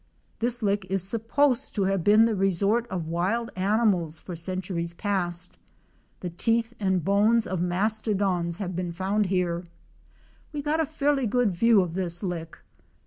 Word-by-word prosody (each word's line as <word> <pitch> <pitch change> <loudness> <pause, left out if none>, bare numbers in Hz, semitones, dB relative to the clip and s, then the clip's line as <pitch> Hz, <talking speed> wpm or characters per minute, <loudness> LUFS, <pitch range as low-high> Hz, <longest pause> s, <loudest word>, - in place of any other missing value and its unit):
This 240 0 0
lick 200 -1 +1
is 195 -1 +2
supposed 230 +6 +1
to 200 - +1
have 195 -2 0
been 215 +4 +6
the 230 - +1
resort 200 +4 +1
of 180 -6 -4
wild 190 +8 -1
animals 185 -5 +1
for 180 - -7
centuries 170 0 -4
past. 180 -3 -2 0.6
The 180 - -4
teeth 230 +6 0
and 190 -5 0
bones 215 +3 +3
of 185 -2 -2
mastodons 190 -2 0
have 185 -3 -4
been 175 -1 -3
found 195 +3 0
here. 180 -2 0 0.9
We 290 -1 -4
got 305 +2 0
a 320 - +1
fairly 285 -4 0
good 245 -1 +2
view 220 +3 +4
of 175 -3 -3
this 175 0 -2
lick. 170 -3 -4
195 Hz, 155 wpm, -26 LUFS, 175-225 Hz, 0.9 s, been